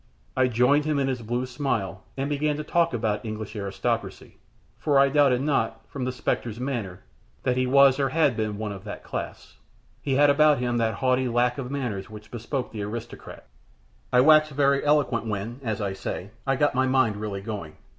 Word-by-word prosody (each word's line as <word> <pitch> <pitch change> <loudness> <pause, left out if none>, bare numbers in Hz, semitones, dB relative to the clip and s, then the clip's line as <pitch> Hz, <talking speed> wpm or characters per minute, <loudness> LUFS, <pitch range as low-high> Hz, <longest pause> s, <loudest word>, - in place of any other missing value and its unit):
I 130 -1 +3
joined 125 +5 +3
him 155 -1 0
in 135 -1 +1
his 130 -2 -2
blue 120 +3 -2
smile, 120 -7 -2 0.2
and 135 +1 -1
began 145 +1 0
to 150 - -4
talk 170 +2 +2
about 110 -4 -1
the - - -8
English 110 0 -6
aristocracy; 100 -2 -3 0.4
for 145 -2 +2
I 140 0 +6
doubted 135 -3 +3
not, 115 -6 0
from 130 -3 -5
the 130 - -1
spectre's 120 -2 -3
manner, 120 -9 -4 0.4
that 125 - +1
he 130 0 +1
was 140 +1 +5
or 135 -1 +2
had 150 -3 +2
been 110 -2 -2
one 105 -1 -4
of 95 -2 -8
that 105 - -8
class. - - -7 0.4
He 135 - -1
had 145 +1 +5
about 150 0 +5
him 120 -1 -1
that 115 -1 0
haughty 130 0 +1
lack 120 +2 +1
of 125 -2 -5
manners 120 -9 -3
which 105 -1 -12
bespoke 125 +3 -4
the 110 - -5
aristocrat. 110 +3 -7 0.7
I 125 - +5
waxed 155 +1 +5
very 140 0 +2
eloquent 135 -6 +2
when, 110 +4 -4
as 110 -4 -2
I 100 -1 -2
say, 95 0 -5 0.2
I 135 - +3
got 145 +2 +2
my 130 0 +2
mind 130 -5 +2
really 105 -2 -4
going. 100 -7 -6
125 Hz, 200 wpm, -25 LUFS, 110-140 Hz, 0.7 s, I